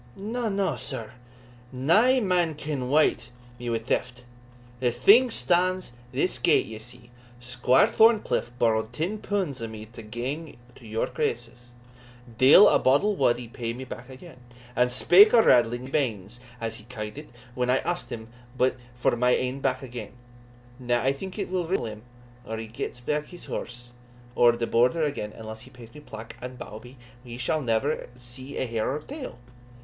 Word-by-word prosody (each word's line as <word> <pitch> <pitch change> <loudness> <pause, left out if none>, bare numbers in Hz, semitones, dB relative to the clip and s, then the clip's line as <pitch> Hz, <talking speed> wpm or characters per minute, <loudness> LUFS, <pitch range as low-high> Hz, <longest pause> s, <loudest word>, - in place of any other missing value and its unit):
"Na, 225 +3 -3
na, 195 -1 0
sir 125 -6 -3 0.6
nae 205 - +4
man 180 -7 +1
can 145 -4 -4
wyte 135 -5 +2 0.3
me 120 0 -4
wi' 115 - +1
theft. 125 +2 -3 0.5
The 125 -1 +1
thing 235 - +6
stands 185 - +1 0.2
this 135 +8 0
gate, 170 -3 +3
ye 110 -1 -8
see. 120 +1 -13 0.3
Squire 125 +1 +3
Thorncliff 220 - +3
borrowed 110 -1 +1
ten 180 +10 -2
punds 185 - -2
o' 115 - -3
me 110 -1 -8
to 115 +1 -12
gang 130 +9 -5 0.2
to 120 - -15
York 110 +1 -3
Races 120 +1 -3 0.7
deil 145 +11 +9
a - - +4
boddle 170 +11 +3
wad 120 -7 +2
he 120 -1 -8
pay 115 0 -4
me 130 +2 -7
back 125 -1 -9
again, 135 +3 -12 0.4
and 125 +1 +2
spake 195 - +7
o' 225 - +7
raddling 120 0 +4
my 130 - -8
banes, 115 -6 -2 0.2
as 115 0 -4
he 105 - -15
ca'd 110 -3 -7
it, - - -12 0.2
when 125 0 -1
I 130 - +4
asked 175 +4 -3
him 110 -1 -7 0.3
but 130 +1 +2 0.2
for 125 0 +1
my 125 +1 +2
ain 130 +2 -2
back 130 -1 -1
again; 120 -4 -8 0.7
now 120 -1 0
I 135 +1 +2
think 185 +7 -8
it - - -2
will 180 -3 -1
riddle 180 -8 0
him 110 -1 -7 0.4
or 110 +1 -5
he 110 - -5
gets 120 +2 -6 0.2
his 175 -1 -11
horse 120 0 -6 0.4
ower 120 -1 +6
the 120 0 -2
Border 125 +9 +2
again 140 -8 -2
unless 110 0 -9
he - - -13
pays 120 -3 -14
me 150 - -11
plack 110 -5 -10
and 125 0 -7
bawbee, 125 +3 -10 0.3
he 120 -1 -8
sall 155 +5 0
never 125 +4 -1
see 125 +2 -10
a - - -1
hair 115 -2 -2
o' - - -1
her - - -18
tail. 280 - -7
125 Hz, 180 wpm, -26 LUFS, 120-155 Hz, 0.7 s, deil